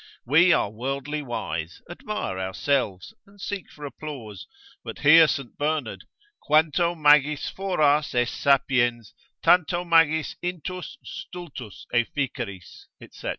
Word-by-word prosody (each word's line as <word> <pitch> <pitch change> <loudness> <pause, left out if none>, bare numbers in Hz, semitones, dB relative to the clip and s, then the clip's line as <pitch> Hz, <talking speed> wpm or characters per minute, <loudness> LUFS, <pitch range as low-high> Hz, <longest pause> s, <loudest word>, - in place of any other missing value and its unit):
We 165 +8 +5
are 105 - +2
worldly 135 +6 -4
wise, 85 - -5
admire 175 - -5
ourselves, 95 0 -1
and 200 0 -21
seek 200 -1 -5
for 150 - -10
applause: 135 -9 -8 0.4
but - - -7
hear 160 +2 +8
Saint 140 -3 -4
Bernard, 150 -5 -2 0.4
quanto 160 +3 +2
magis 150 -1 +3
foras 155 -7 +1
es 120 0 +1
sapiens, 125 -5 +1 0.3
tanto 175 0 +3
magis 165 -2 +3
intus 180 - -5
stultus 165 - -9
efficeris, 120 -6 -3 0.3
&c. - - -7
145 Hz, 110 wpm, -25 LUFS, 120-165 Hz, 0.4 s, hear